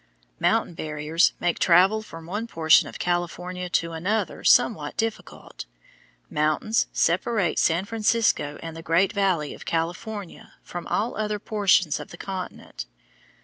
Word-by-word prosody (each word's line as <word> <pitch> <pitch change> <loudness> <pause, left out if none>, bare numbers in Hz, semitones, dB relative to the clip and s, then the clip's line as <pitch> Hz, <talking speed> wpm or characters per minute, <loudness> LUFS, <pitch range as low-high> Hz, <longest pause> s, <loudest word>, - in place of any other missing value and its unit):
Mountain - - +1
barriers 155 +1 +1
make 175 -1 0
travel 190 +5 +5
from 165 -6 -11
one 210 +7 -4
portion 160 -5 +4
of - - -9
California 180 +1 -3
to 170 -1 0
another 185 +7 -2
somewhat - - +3
difficult. 225 -1 -5 0.6
Mountains 155 +9 +1
separate 180 +2 +1
San 170 +4 +2
Francisco 215 -8 +1
and 165 -1 -6
the 165 - -8
Great 165 +6 +2
Valley 185 -8 0
of - - -11
California 180 +4 -4
from 175 -1 -7
all 225 +4 -1
other 210 -1 -2
portions 195 -6 +2
of - - -8
the 175 - -11
continent. 180 - -7
180 Hz, 135 wpm, -25 LUFS, 165-210 Hz, 0.6 s, travel